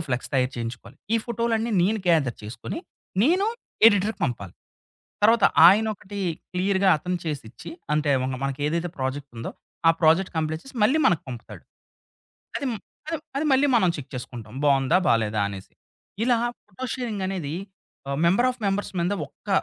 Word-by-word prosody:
Flex 125 -1 -2
తయారు 130 0 +2
చేయించుకోవాలి. 120 +1 -6 0.2
ఈ - - +5
ఫోటో‌లన్నీ 230 -1 0
నేను 210 +4 +1
గేథర్ 150 -8 +3
చేసుకొని, 110 - -6 0.4
నేను 365 +8 +3 0.4
ఎడిటర్‌కి 205 0 0
పంపాలి. 110 - -4 0.7
తర్వాత 225 0 +5 0.2
ఆయన 215 +4 +4
ఒకటి 200 +1 -9 0.3
క్లియర్‌గా 190 +1 +2
అతను 180 +3 -2
చేసిచ్చి 135 -7 -6 0.2
అంటే 150 -1 +1
మెన్న 130 0 -2
మనకి 135 +1 -3
ఏదైతే 170 +2 -1
ప్రాజెక్టుందో, 130 -3 -4 0.4
ఆ - - +9
ప్రాజెక్ట్ 165 +4 +4
కంప్లీట్ 160 +1 -2
చేసి 270 -1 -12
మళ్ళీ 275 +8 +3
మనకు 175 -4 +2
పంపుతాడు. 120 -3 -9 0.9
అది 280 - -3
మ్ - - -3 0.3
అది 325 - -1 0.2
అది 300 +2 0
మళ్ళీ 270 +2 +4
మనం 185 -6 +4
చెక్ 145 - -9
చేసుకుంటాం 120 -3 -7
బావుందా? 135 +1 +4
బాలేదా? 110 -2 +2
అనేసి. 100 -1 -9 0.5
ఇలా 245 0 +4 0.3
ఫోటో 210 +6 -8
షేరింగ్ 230 -6 -3
అనేది 175 -7 -3 0.6
ఆహ్, 140 +1 -2
మెంబర్ 195 +9 +4
ఆఫ్ 250 - -8
మెంబర్స్ 200 +1 -1
మీద 175 +4 +1
ఒక్క 155 - -22
170 Hz, 155 wpm, -25 LUFS, 130-215 Hz, 0.9 s, ఆ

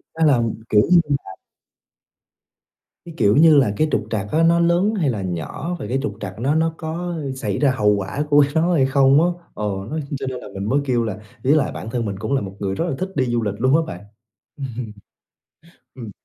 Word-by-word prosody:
Nó 160 - +2
là 135 -6 +4 0.3
kiểu 105 -1 +5
như 175 - +7 0.2
là 95 - -9 1.7
Cái, 170 - -9
kiểu 105 -2 +3
như 155 -1 +7
là, 130 -8 +3
cái 155 - +2
trục 105 - 0
trặc 105 -3 -2
á, 160 +1 +2
nó 170 +1 +4
lớn 175 +5 +2
hay 155 -6 +1
là 110 -5 -2
nhỏ 95 - -4
và - - -5
cái 130 +2 -1
trục 145 - -3
trặc 100 0 -7
nó 135 +5 +1
nó 160 0 +1
có 170 +2 -4 0.2
xảy 105 -7 -3
ra 145 -2 +3
hậu 105 -5 +2
quả 100 +9 -3
của 145 -1 +6
nó 170 +3 +2
hay 140 -6 +3
không 135 +2 +4
á? 175 - +3 0.3
Ờ, - - -6 0.3
nó 155 - -3 0.2
cho 135 - -4
nên 130 -1 -4
là - - -10
mình 100 0 -5
mới 140 - +3
kêu 125 -3 +1
là 105 -3 -4 0.2
với 140 +4 +4
lại 155 - +1
bản 110 - -7
thân 120 0 -2
mình 100 -2 -4
cũng 110 +6 -3
là 135 - +1
một 95 -1 -7
người 95 -1 -2
rất 165 - -1
là 145 - -2
thích 185 - -2
đi 130 - +1
du 120 -2 -1
lịch 105 - -1
luôn 130 +4 +3
á 165 - +4
bạn. 90 - -11 0.5
Ừm. 125 -5 -6 1.0
Ừm. 115 -5 -8
130 Hz, 235 wpm, -21 LUFS, 105-160 Hz, 1.7 s, như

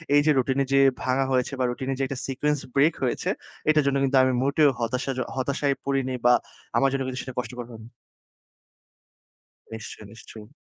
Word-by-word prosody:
এই 145 - +6
যে 155 - +5
রুটিনে 130 +2 +2
যে 135 - +5 0.2
ভাঙা 130 +1 +1
হয়েছে 130 +1 +1
বা - - +2
রুটিনের 130 +2 -3
যে 135 - +1
একটা 135 -1 -5
সিকোয়েন্স 145 +2 0 0.2
ব্রেক 150 +4 +4
হয়েছে, 125 - -1 0.4
এটার 155 -1 +4
জন্য 140 - +2
কিন্তু 135 0 +2
আমি 130 - +2
মোটেও 140 +2 +4
হতাশা 125 +4 -1
জ - - -2 0.2
হতাশায় 140 +1 0
পড়িনি 135 -2 -1
বা 125 - +7 0.4
আমার 135 - +4
জন্য 135 0 -1
কিন্তু 130 0 -4
সেটা 130 -2 -8
কষ্টকর 125 -1 -5
হয়নি। 110 0 -11 1.9
নিশ্চয়, 110 -1 -8
নিশ্চয়ই। 110 -1 -12
135 Hz, 175 wpm, -25 LUFS, 125-140 Hz, 1.9 s, বা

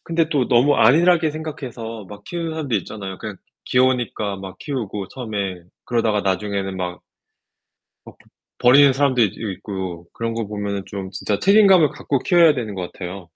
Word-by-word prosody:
근데 165 -1 0
또 140 -6 0
너무 125 +4 +4
안일하게 165 +6 +4
생각해서 125 -8 -7
막 105 +1 -11
키우는 170 -2 -4
사람들 145 -7 -1
있잖아요. 95 0 -7
그냥 105 -2 -7 0.3
귀여우니까 125 -5 +1
막 95 -1 -9
키우고 105 -9 -4
처음에. 100 -8 -4 0.2
그러다가 115 -3 +1
나중에는 95 0 -2
막 90 -1 -4 1.0
어 - - -12
버 - - -32 0.4
버리는 135 +3 +6
사람들도 120 -6 +1
있고 95 -3 -6
그런 115 0 -3
거 115 -1 -3
보면은 100 -1 -3
좀 95 -2 -6
진짜 100 +1 -2
책임감을 195 -6 +5
갖고 140 -1 -2
키워야 170 0 +5
되는 115 -6 -4
것 90 -2 -5
같아요. 90 -1 -8
115 Hz, 370 characters per minute, -21 LUFS, 100-145 Hz, 1.0 s, 버리는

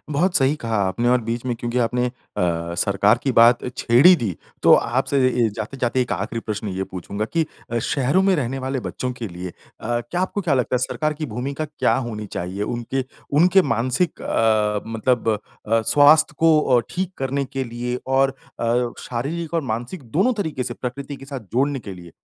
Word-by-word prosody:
बहुत 175 +5 +2
सही 135 +2 +3
कहा 115 -5 -2
आपने, 100 +6 0
और 125 0 +4
बीच 115 +2 -3
में 125 - 0
क्योंकि 120 +1 -2
आपने 125 +1 +1
अ, - - -2 0.6
सरकार 100 +5 +3
की 135 - 0
बात 120 +1 +6 0.2
छेड़ 120 +7 +4
ही 180 - +10
दी, 105 - -3 0.3
तो - - +7
आपसे 130 +4 +1 0.3
ए - - +3
जाते-जाते 125 +3 -1
एक 125 - -4
आखिरी 115 - -3
प्रश्न 105 -1 -4
ये 95 0 -3
पूछूँगा 100 +3 -5
कि 165 -1 +2 0.3
अ, 120 - +1
शहरों 140 +9 +1
में 195 0 +3
रहने 135 -2 -2
वाले 130 0 -2
बच्चों 125 +1 -4
के 120 -3 -6
लिए 90 0 -6
अ, - - -19 0.5
क्या 120 +10 -4
आपको 185 +2 -1
क्या 170 -7 +1
लगता 125 -1 0
है - - +1
सरकार 155 +4 -1
की 155 +1 -4
भूमिका 135 +6 -4
क्या 150 0 0
होनी 110 -4 -4
चाहिए? 95 +1 -4
उनके, 120 +4 -2 0.3
उनके 180 +6 +5
मानसिक 125 +7 0
अ, 105 -2 +2
मतलब 115 +1 0 0.4
अ, 115 +1 +3
स्वास्थ्य 145 +6 +5
को 160 -1 +5 0.2
अ, - - +4
ठीक 185 0 -3
करने 135 +1 -1
के 135 0 -4
लिए 120 +1 -4 0.2
और 135 0 +4 0.3
अ, 120 +1 +1
शारीरिक 155 +7 -4
और 165 - +2
मानसिक 120 +9 -5
दोनों 195 - +3
तरीके 150 -7 -3
से - - -4
प्रकृति 135 +3 -6
के 135 - -12
साथ 135 -1 -6
जोड़ने 135 +3 +1
के 100 -4 -8
लिए, 85 -2 -12
125 Hz, 195 wpm, -22 LUFS, 115-140 Hz, 0.6 s, ही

